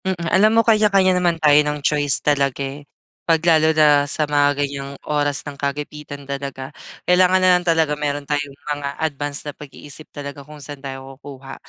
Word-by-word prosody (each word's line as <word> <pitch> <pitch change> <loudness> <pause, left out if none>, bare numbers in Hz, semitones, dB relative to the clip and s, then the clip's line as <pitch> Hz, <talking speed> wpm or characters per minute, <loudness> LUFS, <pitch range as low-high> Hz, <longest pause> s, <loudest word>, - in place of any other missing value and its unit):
Mm. 190 -1 -1 0.2
Alam 215 +3 +5
mo - - +7
kanya-kanya 205 -4 +4
naman 170 -2 +1
tayo 150 -2 +5
ng 150 0 -2
choice 145 -2 +2
talaga, 140 -2 +1
eh. 140 +2 -9 0.3
Pag 165 0 0
lalo 160 -2 +4
na 150 -2 +4
sa 150 - 0
mga 145 -1 +2
ganyang 140 0 -7 0.2
oras 145 -2 0
ng 145 - -7
kagipitan 145 0 -6
talaga 140 0 -6 0.3
kailangan 180 +1 +4
na 185 0 +3
lang 180 - 0
talaga 165 -3 +1
meron 145 -1 -3
tayong 145 -1 -3 0.2
mga 140 -1 -6
advance 145 -2 -3
na 145 - -5
pag-iisip 145 +1 -8
talaga 140 0 -8
kung 150 +1 -13
saan 145 -1 -8
tayo 135 0 -8
kukuha 135 -1 -10
145 Hz, 180 wpm, -20 LUFS, 140-160 Hz, 0.3 s, mo